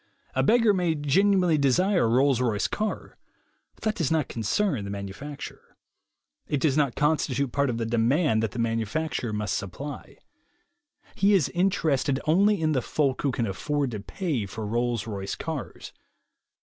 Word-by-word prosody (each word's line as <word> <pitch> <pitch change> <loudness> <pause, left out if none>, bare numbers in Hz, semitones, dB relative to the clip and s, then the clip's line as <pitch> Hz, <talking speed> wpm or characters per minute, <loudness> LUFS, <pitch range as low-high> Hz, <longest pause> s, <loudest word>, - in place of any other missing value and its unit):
A - - +1
beggar 230 -2 +4
may 175 -4 +1
genuinely 180 +3 +3
desire 175 - +3
a - - +1
Rolls 130 +1 +3
Royce 110 -5 +1
car, 215 0 -4 0.6
but - - -19
that 215 - +1
does 165 -9 -1
not 160 -3 +1
concern 120 - -1
the 100 - -6
manu 100 -1 -5
facturer. 145 +5 -9 0.7
It 145 - 0
does 135 -1 +2
not 145 -5 +1
constitute 140 -3 +1
part 140 +1 +1
of 115 - -2
the 115 - -2
demand 120 +2 +2
that 110 - 0
the 95 - -10
manufacturer 115 +3 -1
must 105 -2 -2
supply. 140 +10 -6 1.0
He 200 +1 +3
is 175 -8 +2
inter 180 -3 +1
ested 135 0 +1
only 200 +6 +3
in 160 -1 +1
the 135 -4 +1
folk 140 +1 0
who 140 - +1
can 120 -2 -1
afford 140 +7 -2
to 105 - -4
pay 140 - -3
for 105 +2 -6
Rolls 120 0 -1
Royce 100 -3 -4
cars. 160 -5 -6
140 Hz, 170 wpm, -26 LUFS, 115-160 Hz, 1.0 s, beggar